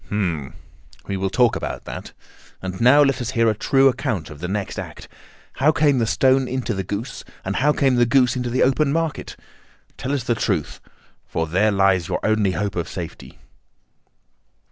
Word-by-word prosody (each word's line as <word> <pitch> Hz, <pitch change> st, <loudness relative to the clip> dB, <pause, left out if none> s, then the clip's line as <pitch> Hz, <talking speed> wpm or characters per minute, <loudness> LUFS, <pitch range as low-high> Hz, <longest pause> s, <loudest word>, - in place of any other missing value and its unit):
"Hum! 85 Hz, -9 st, -2 dB, 0.5 s
We 100 Hz, -, -3 dB
will 95 Hz, 0 st, -1 dB
talk 120 Hz, +3 st, +3 dB
about -, -, -5 dB
that. -, -, -7 dB, 0.5 s
And 95 Hz, +1 st, -6 dB
now 135 Hz, +5 st, +7 dB
let 135 Hz, -2 st, +1 dB
us 120 Hz, -, -3 dB
hear 115 Hz, -1 st, +4 dB
a -, -, -1 dB
true 135 Hz, +5 st, +3 dB
account 125 Hz, -, -1 dB
of 75 Hz, -, -11 dB
the 90 Hz, -, -4 dB
next 100 Hz, +1 st, -3 dB
act. -, -, -8 dB, 0.5 s
How 150 Hz, +3 st, +5 dB
came 145 Hz, -4 st, +2 dB
the 115 Hz, -, +1 dB
stone 130 Hz, +2 st, +3 dB
into 125 Hz, -2 st, -2 dB
the 95 Hz, -1 st, -3 dB
goose, 105 Hz, +8 st, -5 dB, 0.2 s
and 95 Hz, +1 st, -2 dB
how 150 Hz, +3 st, +3 dB
came 135 Hz, -4 st, +2 dB
the 120 Hz, 0 st, +4 dB
goose 125 Hz, -1 st, +3 dB
into 125 Hz, -1 st, -2 dB
the 125 Hz, -, +2 dB
open 140 Hz, +2 st, +2 dB
market? 165 Hz, -1 st, -2 dB, 0.6 s
Tell 130 Hz, -, -3 dB
us 140 Hz, -4 st, -1 dB
the 120 Hz, -, +1 dB
truth, 95 Hz, -9 st, -2 dB, 0.5 s
for 80 Hz, -, -2 dB
there 95 Hz, +7 st, +2 dB
lies 95 Hz, -4 st, +2 dB
your -, -, -1 dB
only 110 Hz, -3 st, +2 dB
hope 100 Hz, 0 st, -2 dB
of 85 Hz, -2 st, -3 dB
safety." 85 Hz, -3 st, -8 dB
115 Hz, 190 wpm, -22 LUFS, 95-130 Hz, 0.6 s, now